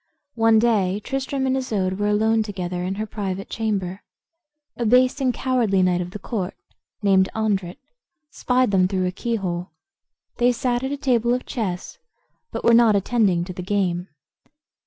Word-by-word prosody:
One 225 -1 +4
day 210 -4 +2
Tristram 270 +3 -2
and 260 0 +1
Isoude 200 -7 -1
were 205 - +1
alone 220 +2 +2
together 180 -4 -4
in 185 +2 -2
her 215 +2 -3
private 195 -2 -5
chamber. 200 -4 -2 0.7
A 240 - -3
base 250 +4 +3
and 260 -2 +2
cowardly 235 -7 +1
knight 180 -1 +2
of 175 - -5
the 190 - -7
court, 200 -2 -4 0.5
named 190 -2 +4
Andret, 195 -5 -1 0.5
spied 250 -3 +1
them 185 -2 +3
through 185 -1 -1
a 180 - 0
keyhole. 185 -4 -3 0.7
They 245 0 +3
sat 245 0 -1
at 265 +1 -3
a 285 - -2
table 245 -3 +2
of 250 - -5
chess, 210 - -4 0.5
but - - -5
were 235 - +5
not 230 -2 +6
attending 200 -4 +2
to 180 +1 -7
the 180 - -6
game. 180 -2 -1
210 Hz, 165 wpm, -23 LUFS, 185-240 Hz, 0.7 s, not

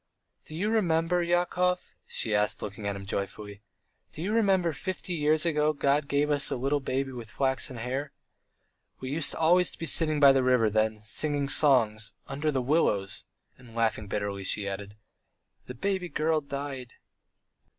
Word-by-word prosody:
"Do 155 - -9
you 205 +6 0
remember, 175 -4 +2
Yakov," 180 +1 0
she 110 - -1
asked, 105 0 +1
looking 105 0 -5
at 100 - -2
him 100 0 -8
joyfully. 100 +1 -5 0.5
"Do 155 - -7
you 205 +4 -1
remember 190 -7 +2
fifty 185 +1 -4
years 155 0 +2
ago 155 -2 +2
God 140 0 +1
gave 145 +1 +1
us 145 -1 +1
a - - -1
little 135 +3 0
baby 135 0 -2
with 120 -3 -8
flaxen 130 0 -1
hair? 130 +5 -3 0.9
We 130 0 -5
used 150 0 0
always 175 +2 +4
to - - -12
be 165 - -4
sitting 155 -1 +2
by 140 -1 +8
the 135 -1 +3
river 125 -4 +3
then, 110 0 +1
singing 145 +5 -1
songs... 115 -8 +2
under 145 +3 -2
the 135 -4 0
willows," 105 -9 +1 0.3
and 120 -2 -15
laughing 110 -2 0
bitterly, 100 -1 -3
she 100 +1 0
added: 100 +1 -6 0.7
"The 125 - -7
baby 190 +4 -2
girl 155 0 +1
died." 140 -3 -6
140 Hz, 165 wpm, -28 LUFS, 110-160 Hz, 0.9 s, by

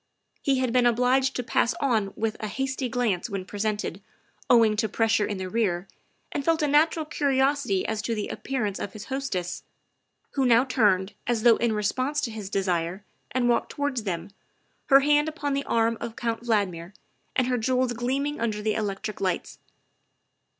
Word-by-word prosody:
He 275 -2 +2
had 255 -2 0
been 250 -1 +4
obliged 250 +3 +2
to 250 - -2
pass 235 - +1
on 220 -8 +1
with 220 -1 -1
a 215 - -3
hasty 265 +3 -2
glance 235 -5 0
when 195 -3 -4
presented, 205 -2 -3 0.5
owing 225 -3 +5
to 220 0 +1
pressure 225 0 +2
in 205 - -3
the 190 0 -4
rear, 190 -3 0 0.4
and 285 - -2
felt 325 +1 +2
a - - +3
natural 310 +2 +3
curiosity 275 - +1
as 220 -1 -2
to 230 +2 -2
the 210 - -3
appearance 220 -7 -3
of 200 - -5
his 215 -1 -8
hostess, 190 -11 -3 0.7
who 275 - 0
now 245 0 +5
turned, 205 -6 +2
as 235 -2 0
though 235 -2 +6
in 235 -2 +1
response 255 +8 0
to 230 - -2
his 215 -3 -6
desire, 185 -1 -1 0.3
and 250 -1 0
walked 240 - +2
towards 285 -4 -1
them, 185 -2 -4 0.6
her 275 -1 +7
hand 295 +2 +3
upon 290 -2 -3
the 280 0 -1
arm 230 0 +1
of 230 -1 -5
Count 230 -1 -2
Valdmir 200 -6 -1 0.4
and 255 - +3
her 250 -1 0
jewels 255 +1 +1
gleaming 265 +4 -2
under 215 -2 -1
the 215 0 +1
electric 210 0 -3
lights. 185 -2 -2
230 Hz, 180 wpm, -26 LUFS, 205-265 Hz, 0.7 s, her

